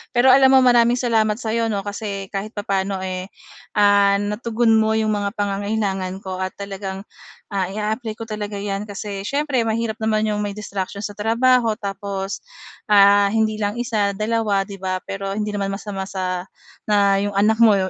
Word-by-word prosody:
Pero 250 +2 +6
alam 265 0 +6
mo, 260 - +6
maraming 240 -1 +5
salamat 225 -4 +1
sa 225 -1 -4
‘yo, 230 0 +1
‘no, 200 -3 -2
kasi 200 -1 -5
kahit 205 +2 -5
papaano, 195 -2 -2
eh, 185 0 -4 0.5
ah, 205 -1 +5
natugon 225 +3 0
mo 220 0 +3
‘yong 220 -1 +1
mga 205 -1 -2
pangangailangan 200 -2 -1
ko 185 -1 -5
at 185 0 -3
talagang, 195 -1 -6 0.5
ah, 195 -2 0
i-a-apply 215 +2 -3
ko 225 - -7
talaga 210 -2 -5
‘yan 200 0 -3
kasi 200 -1 -5
siyempre 280 -4 0
mahirap 225 0 -1
naman 215 -1 +1
‘yong 210 -1 -1
may 205 -1 -3
distraction 200 -1 -5
sa 205 - -3
trabaho, 230 +2 +2
tapos, 195 -1 -4 0.5
ah, 200 0 +6
hindi 220 0 +1
lang 205 0 -1
isa, 215 -5 0
dalawa, 215 -1 0
‘di 200 - -7
ba? 185 0 -2
Pero 195 0 -4
hindi 210 0 -2
naman 195 -1 -1
masama 195 -1 -5
sa 185 -2 -3 0.4
na 200 -2 +3
‘yong 205 -1 -3
anak 220 +2 +3
mo 215 -3 +7
205 Hz, 175 wpm, -21 LUFS, 195-220 Hz, 0.5 s, mo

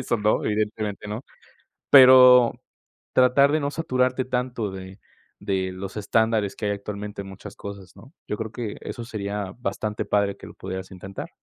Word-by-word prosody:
eso 120 -2 -1
no, 105 0 +1
evidentemente 105 -1 -2
no, 110 +5 -5 0.7
pero 125 -2 +8 0.6
tratar 130 +3 +5
de 155 - +2
no 140 0 -2
saturarte 130 -5 0
tanto 125 -4 -2
de 95 +1 -9 0.4
de 95 -1 -2
los 95 +2 -7
estándares 110 -1 +1
que 110 - -5
hay 105 - +1
actualmente 100 0 -6
en - - -11
muchas 95 +1 -11
cosas, 100 -2 -9
¿no? 135 +6 -16
Yo 105 - -3
creo 110 -1 -5
que 115 -3 -5
eso 120 - -7
sería 100 -3 -4
bastante 105 0 -3
padre 100 -1 0
que - - -11
lo - - -12
pudieras 95 0 -7
intentar. 95 +1 -8
105 Hz, 170 wpm, -24 LUFS, 100-125 Hz, 0.7 s, pero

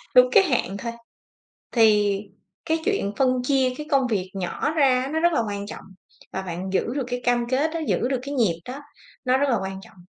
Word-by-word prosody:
đúng - - +8
cái 415 -4 +7
hạn 240 - 0
thôi" 235 +4 -4 0.8
thì 210 -4 +4 0.5
cái 320 0 +1
chuyện 400 - 0
phân 255 -2 +2
chia 265 -1 +2
cái 300 - -6
công 270 -2 +3
việc 195 -5 -1
nhỏ 190 +9 -2
ra 270 -5 +3
á, 265 - -3
nó 320 - +1
rất 340 +1 +3
là 300 - +2
quan 200 -1 -4
trọng, - - -8 0.5
và 190 - -2
bạn 185 0 -5
giữ - - +2
được 280 - 0
cái 245 0 -3
cam 240 -1 +1
kết 280 +5 +1
đó, 330 - -2
giữ 245 - +1
được 265 -1 -1
cái 280 +1 -5
nhịp 200 -11 +1
đó 260 +3 -6 0.5
nó 255 +1 +3
rất 280 +1 +1
là 240 - +3
quan 190 0 -5
trọng, 195 - -17
250 Hz, 225 wpm, -24 LUFS, 200-280 Hz, 0.8 s, đúng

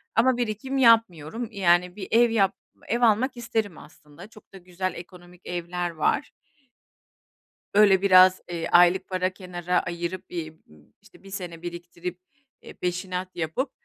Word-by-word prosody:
Ama 245 +2 +3
birikim 245 +3 -3
yapmıyorum. 225 - +3
Eee, 200 - -9
yani, 180 0 +3
bir 195 -3 -7
ev 235 +1 +5
yap 200 -4 +2 0.3
ev 235 +2 -1
almak 240 +3 +2
isterim 220 -6 -3
aslında. 155 +5 -15
Çok 215 -3 -19
da - - -10
güzel 185 +1 -4
ekonomik 180 0 -13
evler 175 0 -3
var. 160 -2 -1 1.4
Böyle 200 -2 +5
biraz, 185 -1 +6
eee, 170 -1 -3
aylık 175 +1 +5
para 185 0 0
kenara 180 -1 -2
ayırıp 175 +1 -5
bir 160 -3 -5
b - - -28 0.4
işte 205 -1 -21
1 195 - -13
sene 175 -4 -7
biriktirip, 175 +1 -7 0.4
eee, - - -12
peşinat 180 +1 -4
yapıp, 175 - -3
185 Hz, 145 wpm, -25 LUFS, 175-210 Hz, 1.4 s, biraz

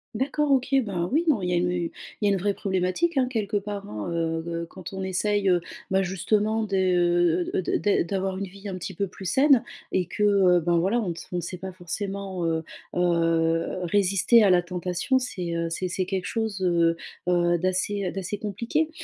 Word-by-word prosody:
D'accord, 285 +4 0
OK, 265 0 +2 0.2
ben, 175 -3 -2
oui, 315 +5 +3
non, 230 -11 +2
il 180 - -1
y - - 0
a - - +3
une 180 +1 +1
il 175 -1 -2 0.3
y - - +4
a - - +4
une 195 - +2
vraie 200 +2 0
problématique, 190 - 0
hein, 255 -1 +3
quelque 210 -4 -1
part, 205 0 -5
hein, 105 +4 -5
heu 165 -1 -1
heu, 170 0 -3
quand 185 +1 -9
on 190 0 -4
essaye, 195 +2 0
heu, 175 -1 +3 0.3
bah, 190 0 +3
justement 210 +4 0
de, 200 - -6
heu, 175 -1 +2
de - - +1
d - - 0
d 205 -4 +2
d'avoir 190 +1 -2
une 195 - -2
vie 200 +2 -11
un 190 - -4
petit 185 0 -6
peu 200 - 0
plus 190 +1 -11
saine 265 - +4 0.3
et 180 -2 0
que, 210 - -2
heu, 190 -4 +5
ben, 170 +1 +2
voilà, 200 +8 +1
on 200 -6 -2
ne - - -1
s - - -10
ne 180 - -1
sait 180 +2 -6
pas 190 0 -6
forcément, 190 +1 -4
heu 160 0 0 0.3
heu, 165 -1 +1
résister 200 +5 +4
à 200 - +5
la 175 -1 +4
tentation. 180 +8 0
C'est, 180 -9 -4
heu, 170 0 -1
c'est 180 +2 -2
c'est 185 +1 -1
quelque 190 -2 -2
chose, 220 -4 -2
heu 170 -2 +3 0.3
heu, 175 -1 +3
d'assez 185 +1 0
d'assez 195 +1 -4
compliqué. 235 +9 -1
185 Hz, 220 wpm, -25 LUFS, 175-205 Hz, 0.3 s, heu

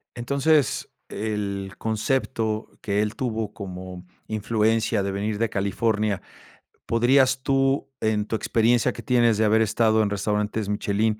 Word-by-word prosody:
Entonces, 140 +4 +1 0.2
e 110 +1 -3
el 100 -2 -3
concepto 110 -1 -1
que 100 0 0
él 105 0 -2
tuvo 110 -5 -3
como 90 -2 -8 0.2
influencia 110 0 +1
de 100 - -2
venir 105 +2 -2
de 115 0 0
California, 105 +1 0 0.6
¿podrías 130 +3 +3
tú, 135 0 +1
en 110 -1 +1
tu 110 - -2
experiencia 115 +2 +2
que 115 - -9
tienes 120 -2 +3
de 110 - +3
haber 110 +1 +4
estado 110 0 +3
en 105 - +1
restaurantes 105 +1 -1
Michelin, 105 +1 0
110 Hz, 140 wpm, -24 LUFS, 105-115 Hz, 0.6 s, haber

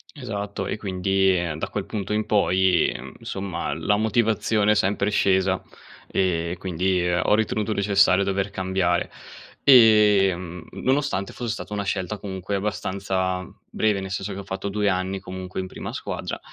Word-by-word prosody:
Esatto 105 -7 -4
e - - -2
quindi, 95 -1 +1
ehm, 85 -3 -2
da - - -2
quel 100 -2 -3
punto 105 -1 -4
in 110 0 0
poi, 95 -4 +3
ehm, - - -7
insomma 95 -2 -4
la 105 - +1
motivazione 110 -1 +2
è - - +4
sempre 100 +1 +1
scesa, 95 -1 +2 0.5
e 85 -2 0
quindi 90 0 0
ho 90 +4 +2
ritenuto 110 -1 0
necessario 100 -2 +3
dover 100 +1 -1
cambiare. 95 -2 0 0.5
Ehm, 100 -8 +5
nonostante 130 -8 -1
fosse 120 -2 -4
stata 105 - -6
una 100 -1 -2
scelta 95 +1 -2
comunque 95 0 -4
abbastanza 95 -2 -2 0.2
breve, 105 -2 +1
nel 95 - -6
senso 95 +1 -3
che 95 - -6
ho - - -6
fatto 95 +1 -4
2 105 0 +1
anni 95 +1 -1
comunque 95 0 -7
in 95 - -3
prima - - -7
squadra, - - -5
95 Hz, 155 wpm, -24 LUFS, 95-105 Hz, 0.5 s, Ehm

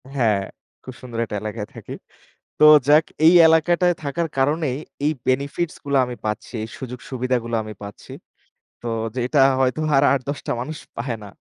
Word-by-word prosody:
হ্যাঁ, 110 -6 +2 0.4
খুব 130 - -9
সুন্দর 120 -3 -8
একটা 105 - -6
এলাকায় 105 0 -5
থাকি। - - -9 0.7
তো 150 - +5 0.2
যাক 150 +2 +6 0.2
এই 165 - +8
এলাকাটায় 175 +2 +3
থাকার 160 +4 -2
কারণেই 145 -1 +1 0.3
এই 150 - +2
benefits 140 +6 -1
গুলা 140 -1 +1
আমি 125 -1 -7
পাচ্ছি, 105 +3 -4
এই - - -8
সুযোগ-সুবিধাগুলা 125 -2 -3
আমি 110 0 -8
পাচ্ছি। 100 -1 -10 0.7
তো - - -9 0.3
যেটা 125 +4 0 0.2
হয়তো 130 +3 +1 0.2
আর 135 - +4
৮-১০ 140 +1 -2
টা - - 0
মানুষ 150 +5 -6 0.2
পায় 120 +1 -3
না। 105 - -9
130 Hz, 155 wpm, -22 LUFS, 115-150 Hz, 0.7 s, এই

